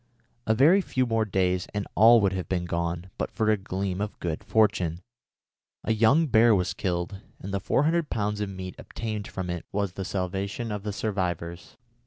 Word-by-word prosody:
A 110 - +3
very 160 - +6
few 130 -8 0
more 115 -2 +1
days 90 -2 0
and 105 - -1
all 115 +1 +7
would 100 -1 +2
have 95 -2 -3
gone 85 0 -2
but - - -1
for 110 -1 +1
a - - +4
gleam 95 -1 -3
of 105 0 -4
good 85 -2 -3
fortune. 100 -7 +2 0.8
A 110 - +1
young 115 +9 +4
bear 115 -4 +5
was 90 -2 0
killed, 90 +1 -3 0.2
and 100 +1 -7
the 100 - 0
400 155 - +1
pounds 105 -1 -1
of 105 - -2
meat 95 -2 -6
obtained 110 -2 -5
from 95 -1 -5
it 85 -1 -4
was 100 -2 -1
the 95 - -4
salvation 100 +5 -3
of 105 -1 -3
the 105 +1 -3
survivors. 90 -5 -3
100 Hz, 185 wpm, -27 LUFS, 90-110 Hz, 0.8 s, all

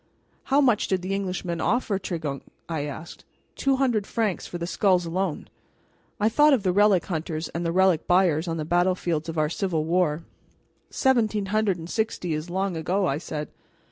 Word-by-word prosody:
"How 275 +2 +3
much 245 -6 +3
did 185 -2 -1
the 190 +1 -2
Englishman 180 -4 -3
offer 215 -2 0
Tregunc?" 160 -7 -4 0.3
I 160 -3 -2
asked. 150 +3 -8 0.3
"Two 275 -1 +1
hundred 245 -7 +1
francs 215 -5 -1
for 175 - -6
the 170 - -4
skulls 180 0 +2
alone." 175 -1 -2 0.7
I 210 - +3
thought 295 +6 +5
of 240 -7 +2
the 185 - +2
relic 200 -2 +4
hunters 160 -2 -3
and 170 - -4
the 165 - 0
relic 185 -2 +3
buyers 175 -3 +3
on 165 -1 -2
the 155 - -3
battlefields 175 -2 0
of 165 - -5
our 155 -1 +2
civil 165 -1 -1
war. 165 -2 +1 0.7
"Seventeen 220 -6 +1
hundred 215 -4 +2
and 165 -1 -8
sixty 215 -5 -2
is 155 +3 -4
long 190 0 -1
ago," 185 +5 0
I 145 -4 0
said. 150 -3 -5
180 Hz, 180 wpm, -25 LUFS, 165-200 Hz, 0.7 s, thought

